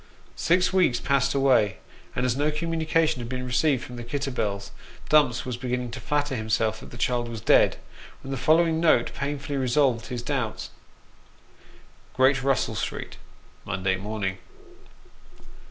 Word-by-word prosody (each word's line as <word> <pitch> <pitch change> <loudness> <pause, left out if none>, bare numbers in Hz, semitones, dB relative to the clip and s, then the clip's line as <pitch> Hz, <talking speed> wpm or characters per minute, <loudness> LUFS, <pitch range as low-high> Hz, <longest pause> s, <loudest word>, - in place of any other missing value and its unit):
Six 180 +2 +3
weeks 180 -10 +3
passed 140 0 +1
away, 130 -8 +3 0.4
and 125 - 0
as 125 -1 +1
no 145 +2 +1
communication 160 -1 0
had 120 -1 -6
been 125 0 -4
received 130 +1 +1
from 125 - -9
the 120 - -6
Kitterbells, 115 -7 -3 0.4
Dumps 145 -5 +3
was 125 -2 -4
beginning 125 -1 -3
to 130 - -6
flatter 145 +3 -1
himself 110 -1 0
that - - -12
the 120 - -11
child 120 0 0
was 115 -1 -6
dead, - - +4 0.5
when 135 - -7
the - - -1
following 160 +4 +3
note 160 -8 +3
painfully 140 0 -3
resolved 130 -2 +1
his 125 -2 -5
doubts 125 -5 -3 1.4
Great 130 0 +4
Russell 135 0 +1
Street, - - -5 0.5
Monday 95 +1 -1
Morning. 100 -1 -4
130 Hz, 145 wpm, -25 LUFS, 120-145 Hz, 1.4 s, dead